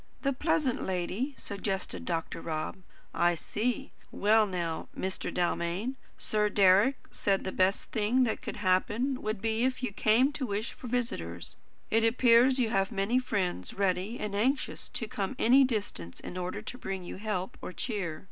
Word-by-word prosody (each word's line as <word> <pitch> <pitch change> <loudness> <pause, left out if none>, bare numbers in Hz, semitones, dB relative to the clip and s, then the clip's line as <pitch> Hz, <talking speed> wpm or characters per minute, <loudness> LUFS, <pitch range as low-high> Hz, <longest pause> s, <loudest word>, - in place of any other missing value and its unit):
"The 275 0 +2
pleasant 305 -2 +1
lady?" 190 +9 -2
suggested 190 - -3
Dr. 165 - -2
Rob. 155 +4 -3 0.4
"I 175 0 +3
see. 225 +8 -2 0.2
Well 215 +1 +4
now, 170 -4 -3
Mr. 190 0 -2
Dalmain, 180 +7 -1 0.2
Sir 210 -1 +1
Deryck 200 +6 +5 0.2
said 195 -1 0
the 190 - -3
best 190 +2 +1
thing 225 +4 +2
that 225 - -1
could - - -5
happen 210 +7 +1
would 215 -2 -3
be 225 +1 +1
if 255 0 0
you 250 - -1
came 230 +8 +4
to 290 -3 -3
wish 205 +2 -2
for 250 - -9
visitors. 90 - -3 0.4
It 225 +1 +4
appears 240 +2 +5
you 235 -4 +1
have 195 -3 +1
many 205 +6 +2
friends 185 - -2
ready 195 +4 0
and 210 -1 -3
anxious 255 +8 0
to 240 -7 -4
come 205 +4 -3
any 260 +4 +6
distance 205 - -2
in - - -8
order 185 +3 -4
to 250 - -6
bring 190 -4 -4
you 175 - -7
help 195 -3 -3
or - - -5
cheer. 180 -4 -3
210 Hz, 165 wpm, -30 LUFS, 185-245 Hz, 0.4 s, any